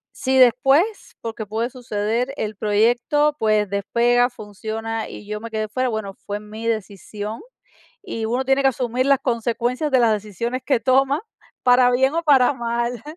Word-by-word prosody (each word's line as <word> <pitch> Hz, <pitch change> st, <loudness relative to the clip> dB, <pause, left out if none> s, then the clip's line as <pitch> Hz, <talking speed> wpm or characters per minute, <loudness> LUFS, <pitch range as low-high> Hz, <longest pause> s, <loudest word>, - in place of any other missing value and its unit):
si 265 Hz, 0 st, 0 dB
después, 270 Hz, -, +3 dB
porque 225 Hz, -1 st, -5 dB
puede 220 Hz, +4 st, -2 dB
suceder, 235 Hz, 0 st, -2 dB
el 215 Hz, 0 st, -3 dB
proyecto, 240 Hz, +9 st, +2 dB
pues, 215 Hz, -2 st, +2 dB
despega, 240 Hz, +5 st, +2 dB
funciona 220 Hz, 0 st, -5 dB
y 205 Hz, -, -10 dB
yo 210 Hz, 0 st, -4 dB
me 230 Hz, 0 st, -8 dB
quedé 215 Hz, -1 st, -2 dB
fuera, 255 Hz, +3 st, -1 dB
bueno, 220 Hz, -3 st, -4 dB
fue 205 Hz, +1 st, -6 dB
mi 215 Hz, +2 st, -9 dB
decisión, 210 Hz, 0 st, -4 dB, 0.6 s
y 230 Hz, -, -5 dB
uno 245 Hz, +4 st, -1 dB
tiene 270 Hz, +1 st, +2 dB
que 270 Hz, -, +5 dB
asumir 250 Hz, 0 st, -1 dB
las 275 Hz, -1 st, +4 dB
consecuencias 240 Hz, +4 st, -1 dB
de 260 Hz, -, +5 dB
las 230 Hz, -2 st, +4 dB
decisiones 215 Hz, +4 st, -3 dB
que 265 Hz, -5 st, +2 dB
toma, 270 Hz, -, +2 dB, 0.4 s
para 250 Hz, 0 st, +5 dB
bien 265 Hz, +3 st, +2 dB
o 335 Hz, -, 0 dB
para 285 Hz, -4 st, +4 dB
mal. 235 Hz, 0 st, -2 dB
235 Hz, 165 wpm, -21 LUFS, 215-255 Hz, 0.6 s, que